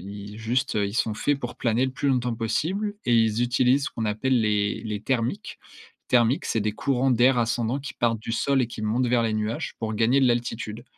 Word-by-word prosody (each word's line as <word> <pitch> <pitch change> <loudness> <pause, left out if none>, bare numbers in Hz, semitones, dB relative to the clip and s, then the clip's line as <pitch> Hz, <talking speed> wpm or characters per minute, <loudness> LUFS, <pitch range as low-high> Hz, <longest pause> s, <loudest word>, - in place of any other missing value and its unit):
i 100 +3 -9
juste, 125 +4 -1
ils 100 0 -1
sont 110 -2 0
faits 145 +5 0
pour 120 -2 -6
planer 120 +2 +1
le 130 - -2
plus 140 +2 -1
longtemps 125 -2 +1
possible 185 - -1
et 120 - +2
ils 115 0 +3
utilisent 125 +2 +2
ce - - -3
qu'on 110 -1 -3
appelle 120 +4 +1
les 105 -1 0
les 105 -2 -4
thermiques. 120 -1 -2 0.5
Thermiques, 120 +2 +3
c'est 110 - 0
des 105 0 -1
courants 135 +2 0
d'air 125 +2 +4
ascendants 120 +3 0
qui 145 - -7
partent 115 -2 0
du 115 - -6
sol 135 +2 +1
et - - 0
qui 115 - -8
montent 115 +4 0
vers 120 -1 +2
les 110 -1 0
nuages 110 +2 -3
pour 110 -1 -3
gagner 115 +5 +3
de 130 - +4
l'altitude 120 -1 -2
120 Hz, 220 wpm, -25 LUFS, 110-130 Hz, 0.5 s, d'air